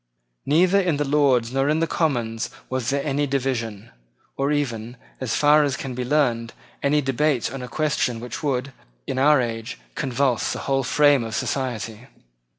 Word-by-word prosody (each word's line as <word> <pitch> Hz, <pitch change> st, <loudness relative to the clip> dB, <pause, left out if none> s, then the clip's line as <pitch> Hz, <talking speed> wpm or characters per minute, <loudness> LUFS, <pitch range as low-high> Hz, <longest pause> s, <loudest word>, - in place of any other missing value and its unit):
Neither 180 Hz, +7 st, +4 dB
in 175 Hz, -6 st, 0 dB
the 145 Hz, -, 0 dB
Lords 135 Hz, -4 st, +2 dB
nor 135 Hz, +1 st, +1 dB
in 155 Hz, +1 st, +2 dB
the 165 Hz, -, +2 dB
Commons 120 Hz, -10 st, -1 dB, 0.2 s
was 130 Hz, -1 st, -1 dB
there 140 Hz, +1 st, -1 dB
any 145 Hz, 0 st, 0 dB
division, 120 Hz, -6 st, -2 dB, 0.4 s
or 140 Hz, +2 st, 0 dB
even, 120 Hz, -5 st, -2 dB, 0.2 s
as 130 Hz, -4 st, -1 dB
far 150 Hz, +1 st, +5 dB
as 140 Hz, -2 st, -1 dB
can 135 Hz, -, -5 dB
now -, -, -6 dB
be 125 Hz, -, -1 dB
learned, 120 Hz, -5 st, +1 dB, 0.3 s
any 145 Hz, +1 st, +2 dB
debate 135 Hz, -1 st, 0 dB
on 135 Hz, -, -5 dB
a 125 Hz, -, -6 dB
question 135 Hz, -4 st, 0 dB
which 120 Hz, +1 st, -6 dB
would, 135 Hz, -2 st, -1 dB, 0.3 s
in 130 Hz, -, -2 dB
our 150 Hz, +1 st, +5 dB
age, 115 Hz, -2 st, -3 dB, 0.2 s
convulse 130 Hz, -, 0 dB
the -, -, -5 dB
whole 135 Hz, -1 st, +1 dB
frame 145 Hz, 0 st, +4 dB
of 115 Hz, 0 st, -5 dB
society. 120 Hz, -3 st, -3 dB
135 Hz, 175 wpm, -23 LUFS, 120-145 Hz, 0.4 s, far